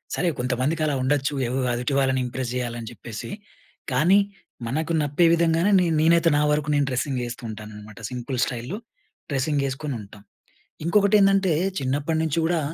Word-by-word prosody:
సరే, 180 - 0
కొంతమందికి 130 +6 0
అలా 150 -2 0
ఉండొచ్చు. 140 +2 +1
ఏవో 125 +2 -2 0.2
ఎదుటి 120 +3 -2
వాళ్ళని 130 -1 +2
ఇంప్రెస్ 125 0 -4
చేయాలని 120 -2 -3
చెప్పేసి. 115 -1 -8 0.6
కానీ, 170 +10 +5 0.5
మనకు 155 +7 -2
నప్పే 145 +4 +2
విధంగానే, 170 +3 +3
నే 180 - +2 0.2
నేనైతే 165 +1 +4
నా - - +3
వరకూ 150 0 0
నేను, 145 -1 +2
డ్రెస్సింగ్ 130 +1 -1
వేస్తూ 120 0 -6
ఉంటాననమాట. 105 0 -9
సింపుల్ 125 +1 -4
స్టైల్‌లో 125 - -5 0.5
డ్రెస్సింగేసుకొని 140 0 -1
ఉంటాం. 100 0 -14 0.6
ఇంకొకటి 200 +3 +4
ఏందంటే, 195 -2 +4 0.3
చిన్నప్పటి 145 +4 -1
నుంచి 160 0 -1
కూడా, 170 -1 +1
140 Hz, 145 wpm, -24 LUFS, 125-165 Hz, 0.6 s, కానీ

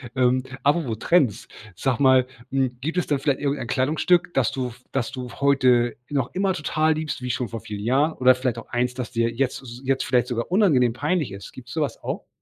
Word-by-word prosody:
Ähm, 130 0 +2 0.2
apropos 140 -6 +1
Trends, 140 - +2 0.3
sag 130 +6 -1
mal, 130 -2 +5 0.3
hm, 130 -2 0
gibt 160 +7 -3
es 180 - 0
denn 145 -2 +1
vielleicht 140 0 0
irgendein 140 -4 -1
Kleidungsstück, 160 +7 +1
dass 125 -4 +2
du 125 -2 -3 0.2
dass 130 -4 -1
du 125 -2 -6
heute 130 -4 +3
noch 135 -4 -1
immer 190 0 +1
total 155 -1 +1
liebst, 155 -3 -4
wie 125 - -4
schon 125 -1 -2
vor 115 - -5
vielen 105 -2 -7
Jahren 140 +7 +2
oder 130 -2 +5
vielleicht 125 -2 -2
auch 115 - -9
eins, 125 +1 0
das 125 -1 -5
dir 115 -1 +1
jetzt 130 +3 -2
s 120 0 -10
jetzt 135 0 0
vielleicht 125 -2 +2
sogar 120 +1 -3
unangenehm 145 - +4
peinlich 150 - -1
ist, 100 -1 -9
gibt 125 -1 -12
's - - -9
sowas 155 -3 -2
auch? - - -5
130 Hz, 215 wpm, -24 LUFS, 125-145 Hz, 0.3 s, mal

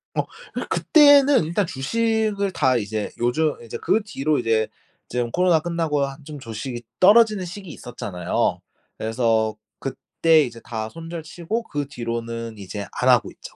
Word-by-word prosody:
어. - - +2
어 - - -12 0.4
그때는 285 - +6
일단 170 +5 0
주식을 215 +6 0
다 130 -7 +2
이제 105 -1 -3
요즘 150 +6 +1
이제 115 - -6
그 220 - +2
뒤로 155 -7 0
이제 110 -2 +1 0.4
좀 120 -1 -2
코로나 180 -2 +3
끝나고 165 -3 -1
한 135 +2 -9
좀 150 -1 -8
주식이 120 +1 -6 0.2
떨어지는 210 0 +6
시기 185 +1 -8
있었잖아요. 100 - -2 0.4
그래서 110 -1 +1 0.2
그때 160 -2 +2
이제 115 -3 -6
다 110 -1 -4
손절 165 +3 -7
치고 175 +8 -4
그 145 -9 -4
뒤로는 115 -3 -5
이제 100 +1 -6 0.2
안 - - +4
하고 - - +4
있죠. - - -13
145 Hz, 300 characters per minute, -23 LUFS, 115-180 Hz, 0.4 s, 그때는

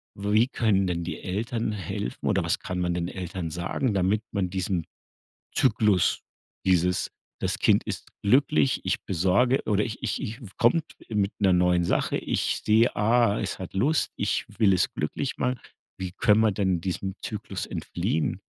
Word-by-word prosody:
Wie 105 +4 +2
können 100 -7 +1
denn 85 -1 -1
die 90 - -5
Eltern 110 +4 -2
helfen 90 -10 -5
oder - - +2
was - - +1
kann 90 -1 -4
man 90 -1 0
den 85 0 -1
Eltern 90 -2 -5
sagen, 85 - -1
damit 100 +3 +1
man 95 -3 -1
diesem 90 -2 -2 0.7
Zyklus 105 -7 +3 0.5
dieses: 90 0 +2 0.3
Das - - -1
Kind - - +4
ist - - -5
glücklich, 100 - +3
ich - - -1
besorge 95 +9 +2
oder 105 -1 +2
ich 115 +2 -6
ich - - -1
ich 110 +4 -5
w 110 - -9
kommt 140 +8 +4 0.3
mit 105 -2 0
'ner 95 -3 +4
neuen 90 0 +3
Sache, 85 - 0
ich - - -1
sehe: 110 +3 +4
„Ah, 115 0 +3
es 100 - -3
hat 95 - -7
Lust, 140 +11 +1
ich - - -1
will 100 -3 +5
es 90 - +1
glücklich 75 - -3
machen.“ 125 -1 -1 0.4
Wie 95 -2 -4
können 105 +3 +3
wir 110 -1 +4
denn 95 -3 0
diesem 95 +1 -3
Zyklus 105 -2 -4
entfliehen? 80 -1 -2
100 Hz, 170 wpm, -26 LUFS, 90-110 Hz, 0.7 s, will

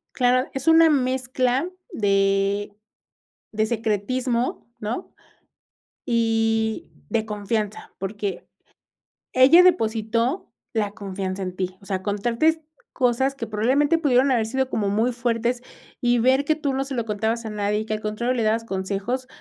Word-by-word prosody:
Claro, 255 +1 +2
es 270 +2 -5
una 325 0 +7
mezcla 260 0 +1 0.2
de 200 - +1 0.8
de 215 0 +1
secretismo, 235 +3 -1
¿no? 225 - -4 0.9
Y 225 -1 +1 0.2
de 225 -2 0
confianza, 210 0 -3
porque 200 +1 -4 0.9
ella 275 +8 +7
depositó 230 - +1 0.2
la 210 -3 0
confianza 195 -2 -5
en 185 -1 -5
ti, 185 0 -3
o - - -16
sea, 190 -2 -2
contarte 235 +11 +1 0.3
cosas 265 +1 +1
que 230 -4 -5
probablemente 265 +9 +2
pudieron 270 -4 +3
haber 230 -3 +2
sido 265 +3 -1
como 205 -5 -1
muy 220 +5 +1
fuertes, 240 0 -1 0.4
y 240 0 +3
ver 260 +4 +3
que 310 - +2
tú 290 -3 -2
no 270 +1 0
se 275 0 -6
lo 235 -3 -2
contabas 220 +2 -1
a - - -3
nadie, 210 0 -1
y 215 - -4
que 215 - -3
al 215 - -3
contrario 215 +4 -1
le 230 - 0
dabas 220 +1 +1
consejos, 200 +6 -3
230 Hz, 145 wpm, -23 LUFS, 210-255 Hz, 0.9 s, una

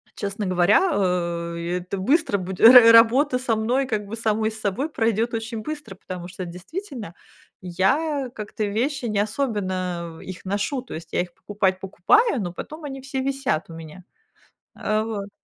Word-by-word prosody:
честно 200 0 -4
говоря, 185 - +3
э, 170 -2 -1
это 185 +2 -5
быстро 260 - +2
буде 185 +3 0
Ра 245 -2 +10
работа 250 +4 +5
со 245 -3 0
мной 245 +5 0
как 215 -4 -2
бы 225 - -5
самой 220 -1 0
с 220 - -10
собой 240 +10 -1
пройдёт 230 -2 0
очень 225 0 -4
быстро, 290 -9 -6
потому 180 -2 -8
что 185 0 -7
действительно 215 - -7 0.5
я 260 - 0
как-то 215 0 -4
вещи 245 +6 -1
не 210 -3 0
особенно 185 -7 -2
их 185 0 -9
ношу, 205 +7 -1
то 255 - -10
есть 165 +1 -8
я - - +2
их 175 -1 -7
покупать- 190 -2 -1
покупаю, 255 - +2
но 175 -3 -4
потом 310 - -8
они 270 -1 -6
все 270 0 -4
висят 270 - -1
у 165 - -9
меня, 165 +3 -10 0.7
э, 215 0 0
вот. 205 -3 -5
210 Hz, 165 wpm, -23 LUFS, 185-255 Hz, 0.7 s, Ра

